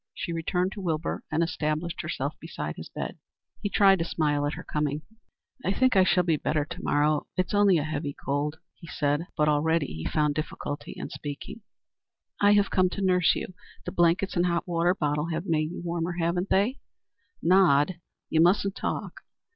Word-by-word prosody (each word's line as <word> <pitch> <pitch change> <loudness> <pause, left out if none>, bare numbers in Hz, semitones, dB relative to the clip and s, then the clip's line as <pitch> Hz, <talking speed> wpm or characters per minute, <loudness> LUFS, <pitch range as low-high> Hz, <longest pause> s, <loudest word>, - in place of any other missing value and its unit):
She 170 - -4
returned 180 +3 0
to 200 - -7
Wilbur 165 -3 -2
and 170 - +2
established 160 0 -2
herself - - -3
beside - - -5
his - - -9
bed. - - -6 0.4
He 205 - -1
tried 195 -2 +5
to - - +1
smile 150 -3 0
at 145 - -2
her - - -8
coming. 150 0 -2 0.6
"I 185 - +1
think 255 +4 +2
I 190 - +7
shall 180 0 +3
be 165 -3 +2
better 150 0 0
to - - -8
morrow. 150 +1 +2
It 185 - +2
is - - -8
only 205 -3 +5
a 150 - 0
heavy 145 -2 -3
cold," 145 +2 -2 0.2
he 170 - -14
said, 150 +2 -1
but 150 - +3
already 155 +1 +2
he 80 - -6
found 150 -2 +2
difficulty 145 -1 -5
in - - -6
speaking. 145 +9 -7 0.8
"I 205 0 +6
have 205 -1 +3
come 185 -1 +3
to 200 - -4
nurse 180 -2 +4
you. - - -5 0.3
The - - -3
blankets 175 +3 +2
and 175 0 +2
hot 170 0 -1
water 175 +1 +2
bottle 150 -2 0
have 165 +1 -3
made 155 -4 +1
you 175 - -7
warmer, 170 0 -2
haven't 175 +2 -1
they? 215 +8 +2 0.6
Nod; 175 -2 +4 0.3
you 160 - +2
mustn't 195 +3 +3
talk." - - -4
170 Hz, 190 wpm, -27 LUFS, 150-185 Hz, 0.8 s, I